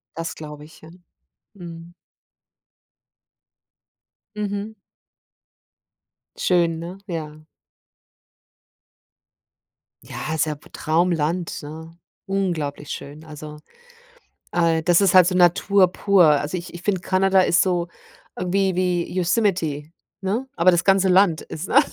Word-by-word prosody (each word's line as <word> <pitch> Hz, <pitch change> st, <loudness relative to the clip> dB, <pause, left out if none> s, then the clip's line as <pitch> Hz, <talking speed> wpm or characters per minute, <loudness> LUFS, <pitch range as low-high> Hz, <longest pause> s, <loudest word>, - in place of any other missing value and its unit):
Das 165 Hz, 0 st, -5 dB
glaube 150 Hz, -1 st, -9 dB
ich. 155 Hz, -, -18 dB
Ja. 160 Hz, -, -13 dB, 0.6 s
Mhm. 170 Hz, -2 st, -11 dB, 2.4 s
Mhm. 210 Hz, +1 st, -4 dB, 1.6 s
Schön, 170 Hz, -3 st, +1 dB
ne? 175 Hz, +3 st, -7 dB
Ja. 155 Hz, -4 st, -6 dB, 2.6 s
Ja, 155 Hz, -, -5 dB
ist 160 Hz, -, +1 dB
ja 150 Hz, -1 st, -3 dB
p 145 Hz, -, -19 dB
Traumland, 165 Hz, +1 st, -1 dB
ne? 160 Hz, +2 st, -9 dB, 0.3 s
Unglaublich 165 Hz, -7 st, -3 dB
schön. 150 Hz, +3 st, -8 dB
Also, 150 Hz, -1 st, -9 dB, 0.9 s
äh, 165 Hz, -2 st, +1 dB
das 175 Hz, 0 st, +4 dB
ist 195 Hz, -3 st, +3 dB
halt 185 Hz, -2 st, +7 dB
so 185 Hz, -, 0 dB
Natur 185 Hz, +2 st, +4 dB
pur. 195 Hz, -2 st, +4 dB
Also 150 Hz, +3 st, +2 dB
ich 175 Hz, 0 st, -8 dB
ich 175 Hz, -, -9 dB
finde, 195 Hz, -2 st, 0 dB
Kanada 190 Hz, 0 st, +3 dB
ist 175 Hz, -1 st, +3 dB
so, 175 Hz, -2 st, 0 dB, 0.5 s
ähm, 180 Hz, -1 st, -3 dB
wie 195 Hz, -1 st, +1 dB
wie 180 Hz, -1 st, 0 dB
Yosemite, 175 Hz, -6 st, 0 dB, 0.3 s
ne? 210 Hz, +7 st, -2 dB
Aber 180 Hz, +2 st, +5 dB
das 175 Hz, 0 st, +1 dB
ganze 195 Hz, -1 st, +3 dB
Land 180 Hz, -3 st, +4 dB
ist, 160 Hz, +4 st, -7 dB
ne? 275 Hz, -, +6 dB
175 Hz, 120 wpm, -22 LUFS, 160-190 Hz, 2.6 s, halt